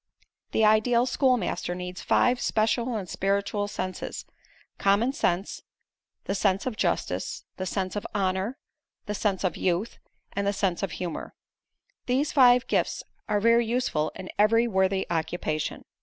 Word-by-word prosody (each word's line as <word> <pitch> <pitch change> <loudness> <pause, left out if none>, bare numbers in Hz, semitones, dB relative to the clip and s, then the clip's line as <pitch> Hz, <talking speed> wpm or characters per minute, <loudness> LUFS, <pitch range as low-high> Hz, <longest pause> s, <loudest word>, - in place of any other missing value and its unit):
"The 220 - +3
ideal 235 +3 +4
schoolmaster 250 -8 +1
needs 180 -2 -6
five 245 +9 +2
special 230 +2 +1
and 200 -4 -3
spiritual 200 +2 -1
senses: 185 -2 -5 0.5
common 205 +7 +3
sense, 190 - -1 0.6
the - - -2
sense 195 0 +1
of 255 -4 -2
justice, - - -2
the 185 - -3
sense 185 0 -2
of 205 - -3
honor, 190 +5 0 0.5
the 210 - -3
sense 200 -2 -1
of 185 - 0
youth 185 +5 -1 0.3
and 200 0 -1
the 200 - +2
sense 190 -3 0
of 195 -6 -2
humor. 175 0 -5 0.7
These 265 +4 +1
five 250 -2 +6
gifts - - 0 0.3
are 210 -1 +2
very 230 +2 +4
useful 230 -11 0
in 185 - -7
every 225 +3 +4
worthy 190 -2 +1
occupation. 160 -2 -2
205 Hz, 140 wpm, -27 LUFS, 185-235 Hz, 0.7 s, five